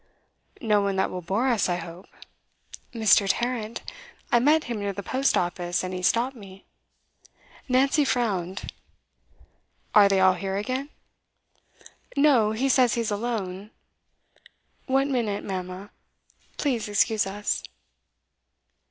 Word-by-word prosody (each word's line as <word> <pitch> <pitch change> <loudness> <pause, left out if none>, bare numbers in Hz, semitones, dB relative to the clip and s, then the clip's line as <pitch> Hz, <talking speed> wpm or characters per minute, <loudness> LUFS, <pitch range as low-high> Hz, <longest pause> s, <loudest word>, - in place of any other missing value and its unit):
'No 210 -3 +2
one 200 -1 -1
that 190 - 0
will 180 - -5
bore 200 +9 -1
us, 230 -7 +1
I 175 - +1
hope.' 175 +1 -8 0.8
'Mr. 220 -3 +4
Tarrant. 235 0 -2 0.5
I 240 - +5
met 300 +5 +3
him 235 -3 -4
near 200 -1 -2
the 200 +1 -6
post 265 +5 +1
office, 175 0 -1
and 185 0 -4
he 180 - -4
stopped 240 +8 +1
me.' 195 -4 -13 1.0
Nancy 270 +4 +3
frowned. 200 -8 -2 1.2
'Are 205 -1 +7
they 195 -1 +3
all 190 0 +5
here 195 +1 -3
again?' 255 +7 -3 1.3
'No; 265 -7 +4
he 235 +5 0
says 255 -3 +3
he's 230 -2 -1
alone. 205 -3 -3 1.2
One 270 +1 +1
minute, 220 -6 -1
mamma; 185 +1 -6 0.7
please 245 -7 -1
excuse 205 0 +2
us. 205 +2 -2
210 Hz, 125 wpm, -25 LUFS, 190-245 Hz, 1.3 s, Are